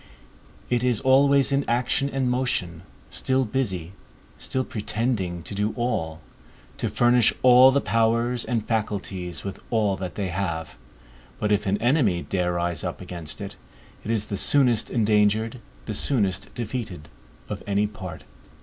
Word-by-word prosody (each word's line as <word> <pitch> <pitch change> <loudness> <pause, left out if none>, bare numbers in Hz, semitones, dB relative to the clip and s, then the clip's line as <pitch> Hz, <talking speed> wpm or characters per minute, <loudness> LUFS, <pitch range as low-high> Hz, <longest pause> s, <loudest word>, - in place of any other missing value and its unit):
It 120 -1 +2
is 125 -3 +2
always 140 +1 +4
in 140 0 +2
action 125 +3 +1
and 135 -2 -1
motion, 125 -10 -1 0.3
still 130 0 0
busy, 95 -9 -2 0.5
still 130 - -2
pretending 105 -5 -2
to 75 - -6
do 105 +2 -1
all, 80 -10 -2 0.6
to 115 - -2
furnish 120 +2 +4
all 125 +1 +8
the 140 +1 +2
powers 115 +1 +1
and 115 -4 -2
faculties 95 -6 -3
with 100 -1 -6
all 105 -4 +1
that 90 -2 -6
they 100 -3 -2
have; 85 -4 -3 0.6
but 105 - 0
if 105 -1 +1
an 100 +1 +2
enemy 115 - +2
dare 90 -2 -1
rise 85 -2 -2
up - - -4
against 85 -4 -6
it, - - -7 0.5
it - - -7
is 110 -2 +1
the 100 - -4
soonest 125 -2 +4
endangered, 110 +1 +2 0.3
the - - -4
soonest 105 -9 0
defeated 110 - -5 0.4
of - - -5
any 100 +1 +2
part. 95 -6 -7
110 Hz, 150 wpm, -24 LUFS, 95-125 Hz, 0.6 s, all